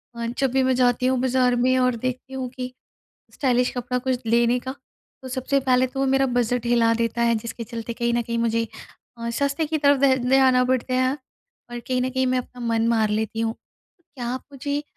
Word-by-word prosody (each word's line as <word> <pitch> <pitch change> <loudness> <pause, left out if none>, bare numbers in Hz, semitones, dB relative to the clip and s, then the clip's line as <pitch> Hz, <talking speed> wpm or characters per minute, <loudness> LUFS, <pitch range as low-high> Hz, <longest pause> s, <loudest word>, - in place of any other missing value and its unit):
अ, 235 0 -4
जब 270 -2 +2
भी 265 0 +2
मैं 260 0 +2
जाती 245 0 +2
हूँ 260 -1 +2
बाज़ार 255 -1 +2
में 255 0 +3
और 250 -1 +2
देखती 255 +2 -4
हूँ 260 -1 -4
कि 255 0 -6 0.6
स्टाइलिश 250 -2 +1
कपड़ा 250 +1 -2
कुछ 255 0 -2
लेने 235 +2 +3
का, 260 +1 -5 0.5
तो 260 - -8
सबसे 260 +2 0
पहले 255 -1 +2
तो 270 +2 -7
वो 270 - +2
मेरा 270 0 +3
बजट 245 0 0
हिला 235 -1 +3
देता 230 +1 -1
है 235 -1 +3
जिसके 230 +1 -5
चलते 230 +1 -6
कहीं 235 0 -1
न 240 - +1
कहीं 235 0 -3
मुझे 230 0 0 0.5
अ, 235 0 -4
सस्ते 280 +5 0
की 315 +1 -1
तरफ़ 285 -2 +3
ध 265 -1 +5
ध्यान 265 -1 +5
आ 250 - +4
पड़ता 255 0 0
है 255 0 +2 0.6
और 240 - -5
कहीं 255 -1 0
न 255 - 0
कहीं 260 0 0
मैं 255 0 +1
अपना 250 0 -9
मन 230 0 +1
मार 220 -2 +2
लेती 220 +1 -2
हूँ। 225 0 -1 0.6
क्या 240 -2 -5
आप 260 - -5
मुझे 285 +2 -2
अ, - - -8
250 Hz, 225 wpm, -23 LUFS, 235-260 Hz, 0.6 s, ध